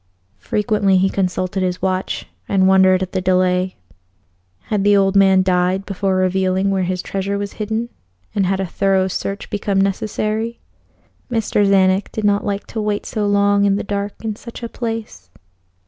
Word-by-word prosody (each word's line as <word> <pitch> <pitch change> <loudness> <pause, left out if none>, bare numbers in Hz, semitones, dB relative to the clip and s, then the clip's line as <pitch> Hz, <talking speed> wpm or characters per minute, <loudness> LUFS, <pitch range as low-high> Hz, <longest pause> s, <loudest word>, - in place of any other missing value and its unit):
Frequently 205 - +1
he 190 +1 +2
consulted 185 0 -1
his 180 -1 -1
watch, 185 0 -2 0.2
and 190 -1 +3
wondered 190 -1 +5
at 185 - -6
the 190 - -1
delay. 185 0 +1 0.9
Had 205 - -2
the 205 0 +5
old 195 0 +2
man 190 -1 +5
died 185 +1 +1
before 195 -1 -1
revealing 185 +1 +1
where 190 -1 0
his 180 0 -2
treasure 195 +1 -2
was 200 0 -4
hidden, 220 +2 -3 0.5
and 200 -3 +1
had 190 0 0
a 190 - 0
thorough 190 +1 +1
search 195 +2 -4
become 200 -1 0
necessary? 215 +3 -1 0.7
Mr. 225 -3 +1
Czanek 195 0 +3
did 220 - -4
not 205 0 +2
like 200 -1 -3
to 220 - -5
wait 210 -1 -2
so 210 -2 -2
long 200 0 +3
in 200 -1 +3
the 205 - -2
dark 205 +1 -4
in 215 -1 -2
such 235 +2 -10
a 235 - -4
place. 225 - -5
195 Hz, 170 wpm, -19 LUFS, 185-205 Hz, 0.9 s, wondered